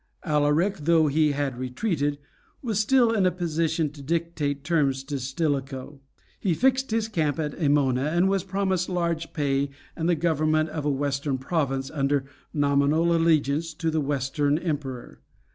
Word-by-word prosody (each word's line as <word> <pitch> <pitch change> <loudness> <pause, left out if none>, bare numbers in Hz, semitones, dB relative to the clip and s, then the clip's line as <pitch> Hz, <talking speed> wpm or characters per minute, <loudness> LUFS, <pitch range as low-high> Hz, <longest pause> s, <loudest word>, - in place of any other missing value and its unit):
Alaric, 150 +5 +2
though 160 +1 +3
he 150 0 +2
had 140 -3 -2
retreated, 145 - -1 0.5
was 220 -5 -1
still 240 +1 +4
in 200 -5 +3
a - - +2
position 165 -3 -1
to 145 -1 -12
dictate 150 -2 -2
terms 140 -5 +1
to 140 0 -4
Stilicho. 135 0 -3 0.4
He 180 -5 0
fixed 265 +3 +2
his 225 0 0
camp 160 -9 0
at 150 -2 -1
Æmona, 140 -3 +2
and 175 +3 +3
was 195 -2 +1
promised 190 -2 -1
large 170 -2 -1
pay 140 -2 0 0.3
and 165 +1 -1
the 175 - +4
government 155 -1 +1
of 155 -2 -4
a - - +2
Western 140 0 -1
province 135 -2 -2
under 140 -2 0 0.3
nominal 145 +3 +2
allegiance 160 -1 +1
to 165 -1 -1
the 155 0 0
Western 145 +1 0
Emperor. 145 -7 -4
155 Hz, 155 wpm, -25 LUFS, 140-170 Hz, 0.5 s, still